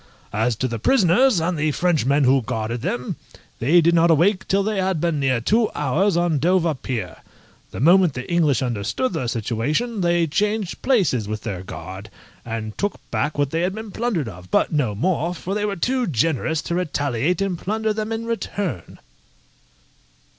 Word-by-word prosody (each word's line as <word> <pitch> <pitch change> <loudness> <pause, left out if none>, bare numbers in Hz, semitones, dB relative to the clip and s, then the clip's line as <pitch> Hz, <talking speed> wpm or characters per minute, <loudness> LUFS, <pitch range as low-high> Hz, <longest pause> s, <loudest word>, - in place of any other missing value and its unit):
As 110 +3 +1
to 130 - -1
the 115 -2 -4
prisoners, 230 - +4
and 170 +2 0
the 155 0 +1
Frenchmen 145 -4 +2
who 130 +1 +4
guarded 110 +1 -3
them, 120 +1 -3 0.4
they 160 +9 +4
did 170 +1 +3
not 170 0 +4
awake 185 +5 +3
till 195 +1 +2
they 215 0 -1
had 185 -3 0
been 165 -2 0
near 130 -3 +1
two 215 - +2
hours 170 +7 +1
on 170 -4 +1
Dover 170 +1 +2
Pier. 115 - -5 0.5
The - - -8
moment 175 0 +5
the 125 0 -5
English 160 -6 +2
understood 120 - -2
their 150 -7 -2
situation 135 - -1
they 175 -1 +2
changed 205 +4 -1
places 175 - +2
with 110 0 -4
their 100 -6 -4
guard, 95 +2 -8 0.3
and 110 -2 -5
took 205 0 -1
back 145 +1 -1
what 145 -1 0
they 165 - 0
had 185 +2 -1
been 220 -1 -7
plundered 200 - -1
of, 90 -3 -10
but - - +2
no 125 -9 0
more, 175 - 0
for 185 +2 -5
they 210 0 -1
were 205 -1 -2
too 250 +7 0
generous 160 +2 0
to - - -3
retaliate 145 -2 0
and 195 -4 -1
plunder 220 +3 -1
them 215 +1 -3
in 225 0 -3
return. 200 - -4
165 Hz, 180 wpm, -22 LUFS, 125-195 Hz, 0.5 s, moment